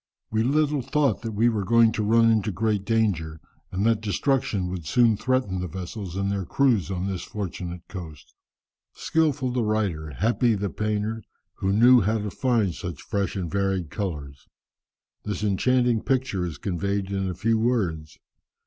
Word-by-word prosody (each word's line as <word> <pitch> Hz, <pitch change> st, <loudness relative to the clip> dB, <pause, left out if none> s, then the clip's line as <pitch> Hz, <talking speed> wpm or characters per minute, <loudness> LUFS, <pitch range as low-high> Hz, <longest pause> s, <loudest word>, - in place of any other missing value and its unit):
We 110 Hz, 0 st, +1 dB
little 145 Hz, +3 st, +2 dB
thought 140 Hz, -4 st, +1 dB
that 115 Hz, -1 st, -4 dB
we 110 Hz, +3 st, +3 dB
were 110 Hz, -4 st, +1 dB
going 115 Hz, +2 st, +5 dB
to 110 Hz, -, -2 dB
run 115 Hz, +2 st, +4 dB
into 110 Hz, -1 st, +1 dB
great 105 Hz, +1 st, -1 dB
danger, 95 Hz, -9 st, 0 dB, 0.3 s
and 95 Hz, +3 st, -1 dB
that 115 Hz, -2 st, +2 dB
destruction 110 Hz, -1 st, 0 dB
would 85 Hz, -4 st, -6 dB
soon 120 Hz, 0 st, +4 dB
threaten 125 Hz, -5 st, 0 dB
the 90 Hz, -, -3 dB
vessels 95 Hz, +2 st, -6 dB
and 100 Hz, 0 st, -1 dB
their 100 Hz, -1 st, -1 dB
crews 115 Hz, -1 st, +2 dB
on 95 Hz, -1 st, -2 dB
this 95 Hz, -3 st, -3 dB
fortunate 90 Hz, -3 st, -6 dB
coast." 80 Hz, -7 st, -9 dB, 0.6 s
Skilful 145 Hz, -5 st, 0 dB
the 125 Hz, 0 st, 0 dB
writer, 100 Hz, -8 st, -1 dB
happy 115 Hz, -, +1 dB
the 100 Hz, -2 st, -2 dB
painter, 105 Hz, +2 st, -2 dB, 0.4 s
who 95 Hz, -, 0 dB
knew 120 Hz, +4 st, +6 dB
how 110 Hz, +3 st, +1 dB
to 105 Hz, -1 st, -4 dB
find 115 Hz, -8 st, +1 dB
such 85 Hz, -3 st, -6 dB
fresh 100 Hz, -3 st, -2 dB
and 90 Hz, -4 st, -3 dB
varied 95 Hz, -4 st, -1 dB
colours! 70 Hz, -9 st, -5 dB, 0.8 s
This 105 Hz, 0 st, -4 dB
enchanting 120 Hz, +3 st, +2 dB
picture 125 Hz, -9 st, 0 dB
is 80 Hz, -, -7 dB
conveyed 100 Hz, +1 st, -2 dB
in 95 Hz, -1 st, -1 dB
a 90 Hz, -, -4 dB
few 110 Hz, +4 st, +1 dB
words. 90 Hz, -11 st, -1 dB
105 Hz, 165 wpm, -25 LUFS, 95-115 Hz, 0.8 s, knew